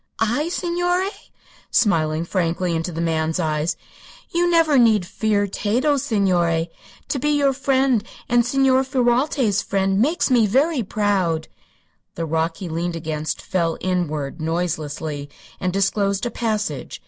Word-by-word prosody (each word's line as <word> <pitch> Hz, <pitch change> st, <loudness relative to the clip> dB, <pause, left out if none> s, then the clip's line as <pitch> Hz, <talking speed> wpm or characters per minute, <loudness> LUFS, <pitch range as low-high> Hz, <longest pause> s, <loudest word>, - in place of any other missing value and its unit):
"I, 240 Hz, +9 st, 0 dB
signore?" 355 Hz, +2 st, 0 dB, 0.6 s
smiling 160 Hz, -6 st, +2 dB
frankly 175 Hz, -1 st, -1 dB
into 165 Hz, +2 st, -2 dB
the 165 Hz, -, -5 dB
man's 160 Hz, 0 st, 0 dB
eyes; 155 Hz, 0 st, -1 dB, 0.5 s
"you 345 Hz, +1 st, +2 dB
need -, -, +2 dB
never 275 Hz, -10 st, +5 dB
fear 205 Hz, +2 st, 0 dB
Tato, 240 Hz, +9 st, 0 dB
signore. 175 Hz, -8 st, +1 dB, 0.4 s
To 275 Hz, -, -1 dB
be 295 Hz, -, 0 dB
your 285 Hz, -2 st, +3 dB
friend, 265 Hz, -4 st, +2 dB, 0.2 s
and 240 Hz, 0 st, +3 dB
Signor 265 Hz, +1 st, +3 dB
Ferralti's 250 Hz, -3 st, +1 dB
friend, 195 Hz, 0 st, 0 dB
makes 300 Hz, +2 st, +1 dB
me 235 Hz, -4 st, +4 dB
very 275 Hz, +6 st, +2 dB
proud." 190 Hz, -6 st, 0 dB, 0.7 s
The 165 Hz, -, -3 dB
rock 165 Hz, +1 st, -1 dB
he 190 Hz, -, -6 dB
leaned 170 Hz, +1 st, -3 dB
against 155 Hz, -1 st, -4 dB
fell 170 Hz, -3 st, -1 dB
inward, 160 Hz, -5 st, -2 dB
noiselessly, 155 Hz, -3 st, -3 dB, 0.3 s
and 185 Hz, -, -1 dB
disclosed 195 Hz, +2 st, 0 dB
a 240 Hz, -, -2 dB
passage. 215 Hz, -, -3 dB
200 Hz, 135 wpm, -21 LUFS, 165-255 Hz, 0.7 s, never